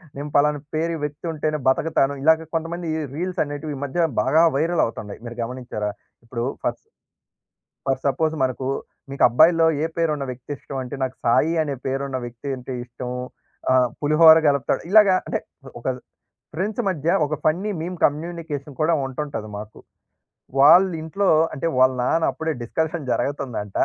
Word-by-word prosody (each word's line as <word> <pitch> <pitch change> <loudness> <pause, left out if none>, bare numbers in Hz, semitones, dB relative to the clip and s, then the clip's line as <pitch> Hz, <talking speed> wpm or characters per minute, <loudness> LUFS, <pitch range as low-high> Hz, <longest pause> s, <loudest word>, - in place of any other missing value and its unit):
నేను 145 +2 -5
పలానా 145 0 +2
పేరు 165 +1 0
వ్యక్తి 150 +2 -5
ఉంటేనే 155 0 -1
బతకతాను." 140 0 +2
ఇలా 160 +2 +7 0.2
కొంతమంది 165 +1 -3 0.3
రీల్స్ 180 +3 -2
అనేటివి, 145 +1 -5
ఈ - - -8
మధ్య 165 +4 +1
బాగా 150 +8 +4
వైరల్ 165 +3 +2
అవుతున్నాయి. 105 -2 -7
మీరు 120 0 -8
గమనించారా? 115 -4 -4 0.3
ఇప్పుడు 115 0 -4 0.2
ఫర్ - - +1
స్... - - -36 1.1
ఫర్ 135 -1 0
సపోజ్ 155 +3 +1
మనకు, 130 0 -1 0.4
మీకు 140 - -1
అబ్బాయిలో 165 +6 +5 0.2
ఏ - - +2
పేరు 165 -2 +2
ఉన్న 140 -2 -4
వ్యక్తి 130 +3 -7
ఇష్టం 135 - -8
అంటే, 125 +2 -6
నాకు 130 0 -3
సాయి 130 +8 +3
అనే 145 -2 -3
పేరున్న 135 0 -2
వ్యక్తి 120 +3 -7
అంటే 125 +1 -7
ఇష్టం. 125 0 -7 0.6
ఆహ్, 130 -1 +5
పులిహోర 160 +2 +7
కలుపుతాడు. 140 -2 +1
ఇలాగా 210 -2 +7
అంటే - - -1 0.4
ఒక 120 - -7 0.7
ఫ్రెండ్స్ 205 +8 -2
మధ్య, 160 -4 -3 0.2
ఒక 150 +1 -2
ఫన్నీ 180 +7 +1
మీమ్ 180 +2 -5
కమ్యూనికేషన్ 150 -2 -3
కూడా 160 +2 +3
ఉంటుంటది 135 -4 -5
మాకు. 105 +1 -9 0.8
వాళ్ళ 165 +7 +8
ఇంట్లో, 195 +5 -1 0.3
అంటే 155 +2 -2
వాళ్ళ 130 0 +5
నాన్న 160 +6 +2
అప్పుడే 160 0 -3
డిస్కషన్ 160 +4 -2
జరుగుతుందంట. 120 -8 -2
145 Hz, 155 wpm, -23 LUFS, 130-165 Hz, 1.1 s, వాళ్ళ